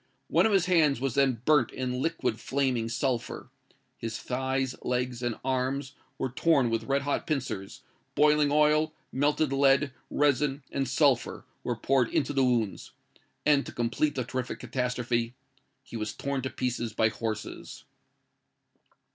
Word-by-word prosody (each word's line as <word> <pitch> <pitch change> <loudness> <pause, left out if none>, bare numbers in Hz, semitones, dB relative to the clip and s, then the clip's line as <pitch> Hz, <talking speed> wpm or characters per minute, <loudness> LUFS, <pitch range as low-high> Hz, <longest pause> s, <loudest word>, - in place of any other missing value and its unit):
One - - +4
of - - 0
his 195 -3 +3
hands 160 -7 +3
was 135 -2 -1
then 130 -4 +2
burnt 150 -6 +4
in 125 0 -3
liquid 165 -8 -1
flaming 130 -4 0
sulphur; 120 0 -2 0.5
his 115 -1 -4
thighs, 130 +1 -1
legs, 125 -1 -2
and 120 -2 -2
arms, 130 +1 -1 0.2
were 130 - -2
torn 135 -3 +2
with 115 - -1
red 140 +1 +1
hot 145 - -1
pincers: 130 -10 -3 0.3
boiling 150 -1 +4
oil, 150 +1 +3 0.2
melted 145 +1 +1
lead, 135 +1 +4 0.2
resin, 145 -1 +1
and 135 -2 -1
sulphur, 130 -3 +2 0.2
were 120 - -1
poured 125 +1 +2
into 145 0 0
the 135 -1 +3
wounds; 120 -5 0 0.5
and, 145 -2 +4
to - - -6
complete 120 +6 0
the 130 - -1
terrific 125 +1 -4
catastrophe, 125 -2 -1 0.5
he 125 - -11
was 110 -1 -3
torn 140 -1 -3
to 130 - -3
pieces 120 -3 -2
by 110 0 +3
horses!" 110 -1 -5
130 Hz, 145 wpm, -28 LUFS, 120-140 Hz, 0.5 s, One